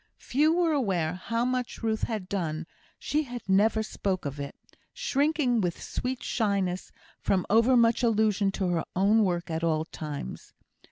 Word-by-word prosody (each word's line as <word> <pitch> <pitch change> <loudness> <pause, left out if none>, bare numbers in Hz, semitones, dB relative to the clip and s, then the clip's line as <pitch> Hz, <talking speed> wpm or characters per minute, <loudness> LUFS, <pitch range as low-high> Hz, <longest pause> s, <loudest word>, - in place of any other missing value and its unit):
Few 300 +5 +2
were 340 -1 +2
aware 190 - 0
how 230 +6 -2
much 250 -2 -2
Ruth 220 -1 0
had 215 -5 -4
done; 165 -5 -2 0.3
she 300 -3 -1 0.2
never 215 +3 +3
spoke 195 -4 -2
of 140 0 -4
it, 140 0 -5 0.4
shrinking 290 - +1
with 175 -3 -2
sweet 255 0 -4
shyness 195 -5 -1 0.3
from 185 -2 +1
over 230 +4 +5
much 235 0 +4
allusion 215 -3 +2
to 190 -2 -1
her 170 -2 0
own 205 +4 +4
work 175 -2 -1
at 160 +1 -2
all 160 -1 +1
times. 150 - -7
210 Hz, 155 wpm, -28 LUFS, 180-245 Hz, 0.4 s, over